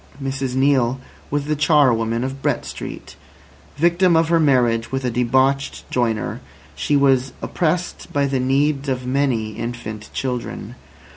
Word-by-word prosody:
Mrs 135 -1 -3
Neale 130 -2 +2 0.3
was 145 0 -1
the 150 +1 0
charwoman 125 -7 +3
of 135 +1 -5
Brett - - 0
Street. - - -8 0.6
Victim 170 +2 +3
of 165 0 +3
her 170 -1 +4
marriage 120 -6 +2
with 135 -1 -2
a 125 - 0
debauched 130 +3 +1
joiner, 115 -3 -1 0.3
she 145 - +1
was 135 -2 +3
oppressed 175 +1 -2
by 145 -1 +1
the 135 -1 0
needs 140 +2 +1
of 130 -1 -2
many 125 -5 0
infant 110 -1 -6
children. 125 -2 -4
135 Hz, 140 wpm, -21 LUFS, 125-145 Hz, 0.6 s, her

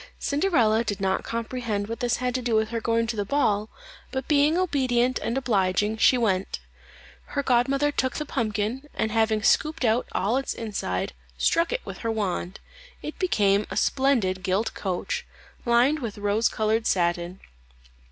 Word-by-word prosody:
Cinderella 275 - +2
did 205 -4 -3
not 190 -1 0
comprehend 230 -3 -3
what 230 +1 -5
this 245 0 +1
had 250 0 -2
to 255 - -1
do 235 -2 0
with 220 0 +2
her 230 -1 -3
going 230 0 +1
to 230 0 -3
the 205 - -1
ball, 215 -3 +1 0.4
but 265 -1 -3
being 300 +2 +3
obedient 255 -8 +1
and 235 - -2
obliging, 210 -4 +1
she 255 - +5
went. 195 -5 0 0.7
Her 280 - -3
godmother 275 +3 +2
took 260 -2 -1
the 300 - -3
pumpkin, 225 +4 -2
and 220 - -1
having 220 -1 +1
scooped 310 +1 +2
out 225 +2 +2
all 215 +7 +1
its 270 - -2
inside, 145 - -3 0.2
struck 335 - +2
it - - -3
with - - -7
her 230 - -3
wand; 195 -4 -2 0.4
it 300 - -6
became 205 - +2
a - - -4
splendid 240 -9 +1
gilt 190 +4 0
coach, 185 -3 -3 0.4
lined 245 +6 +4
with 230 -6 -5
rose 205 +2 +1
coloured 220 +1 0
satin. 175 0 0
230 Hz, 165 wpm, -25 LUFS, 205-260 Hz, 0.7 s, she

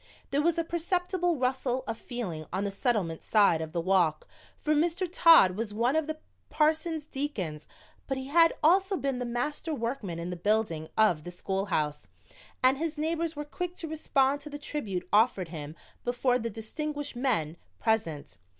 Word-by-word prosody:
There 280 +2 +2
was 335 +1 +2
a 335 - +1
perceptible 350 +1 0
rustle 255 0 0
of 225 - -3
feeling 205 - -5
on 190 +2 -1
the 200 - -2
Settlement 195 - -1
side 200 -7 +3
of 160 -1 -5
the 170 - -2
walk, 170 -3 +2 0.3
for 305 - 0
Mr. 340 +4 +1
Todd 330 - +7
was 210 0 -4
one 240 +6 +2
of 315 -1 +1
the 315 0 -3 0.3
parson's 315 +1 +1
deacons, 200 - -3 0.4
but 270 - -1
he 265 - -5
had 330 +4 +5
also 380 +4 +4
been 275 -4 -2
the 250 - -2
master 290 +6 -2
workman 230 -8 -3
in 170 +1 -4
the - - -3
building 175 -4 0
of 195 -9 +3
the 175 - -7
schoolhouse, 175 -5 -2 0.6
and 260 +2 +5
his 320 -1 -2
neighbors 325 +1 -1
were 295 0 -5
quick 355 +4 -5
to 330 - -5
respond 285 -3 +1
to 300 - -8
the 290 - -6
tribute 220 -12 -4
offered 205 -5 +3
him 155 -2 -7 0.3
before 245 +1 +1
the 230 0 -3
distinguished 290 +7 -4
men 220 - 0 0.2
present. 170 - -1
250 Hz, 175 wpm, -29 LUFS, 190-305 Hz, 0.6 s, Todd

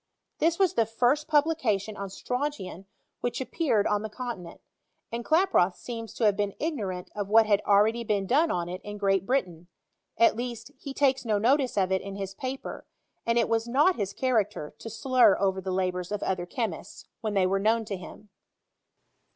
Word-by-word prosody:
This 330 +1 +2
was 380 -2 +3
the 230 - +2
first 250 +7 +1
publication 275 -10 +1
on 200 -1 -5
strontian 250 - -4 0.3
which 245 - -2
appeared 260 -6 0
on 210 -1 +1
the 220 - -5
con 240 -1 -5
tinent; 170 -1 -11 0.5
and 235 +1 -3
Klaproth 315 - +3
seems 230 -2 -7
to - - -3
have 205 -2 +4
been 205 -1 -2
ignorant 205 - -3
of 205 -2 -3
what 220 +2 +6
had 205 -2 +3
been - - -10
already 220 +4 +4 0.2
done 290 - +3
on 175 - -1
it 180 +1 -6
in 205 0 -7
Great 195 -2 +1
Bri 265 +2 +3
tain; 175 -1 -15 0.5
at 230 - +5
least, 240 +3 -5
he 280 - -7
takes 270 -2 +2
no 220 -3 +1
notice 255 +3 +2
of 190 -1 +2
it 190 - +1
in 195 0 -7
his 195 -1 -5
paper, 260 +6 -6 0.4
and 230 0 +2
it 235 - +3
was 225 0 0
not 290 +10 +4
his 200 -3 -2
character 210 - -1
to 225 - -7
slur 240 -1 +4
over 190 -1 0
the 190 - -5
labouM 185 0 -1
of 210 - -2
other 180 -2 -2
chemists, 215 -3 -5
when 215 -2 -3
they 190 -2 +4
were 195 +1 +1
known 220 +2 +2
to 205 - -4
htm. 195 +3 -11
215 Hz, 195 wpm, -27 LUFS, 195-255 Hz, 0.5 s, what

